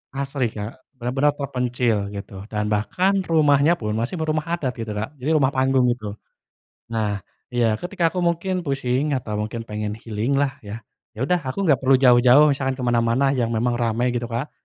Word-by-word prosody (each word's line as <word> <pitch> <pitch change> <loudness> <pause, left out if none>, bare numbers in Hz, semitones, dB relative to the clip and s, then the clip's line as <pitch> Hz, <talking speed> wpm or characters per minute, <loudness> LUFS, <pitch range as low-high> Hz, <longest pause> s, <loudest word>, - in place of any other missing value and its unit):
asri, 135 -2 -1
Kak, 110 +2 -7 0.2
benar-benar 135 +4 0
terpencil, 125 -6 -1
gitu, 100 0 -8
dan 105 -1 -2
bahkan 185 - +1
rumahnya 150 0 +4
pun 105 -8 -4
masih 115 +10 -2
berumah 155 -1 -1
adat, 135 -7 -2
gitu, 115 -1 -4
Kak, 110 +8 -5
jadi 150 +5 +1
rumah 135 -3 +3
panggung, 130 -1 +2
gitu. 110 -4 -5 0.8
Nah, 105 -4 -1 0.2
iya, 115 -4 +1
ketika 175 -2 0
aku 185 - -3
mungkin 175 +2 0
pusing 140 -1 -1
atau 105 -4 -3
mungkin 110 +2 -4
pengen 105 -1 -4
healing, 115 +3 -2
lah 140 -1 0
ya. 105 +1 -8 0.3
Yaudah, 150 +10 +1
aku 195 +10 -2
nggak 150 -7 +3
perlu 135 0 +4
jauh-jauh, 130 +3 +6
misalkan 135 -1 -1
kemana-mana 120 +1 +1
yang 125 -4 0
memang 120 +1 0
ramai, 120 +1 +1
gitu, 120 -1 -2
Kak. 120 +5 -4
125 Hz, 170 wpm, -22 LUFS, 115-145 Hz, 0.8 s, jauh-jauh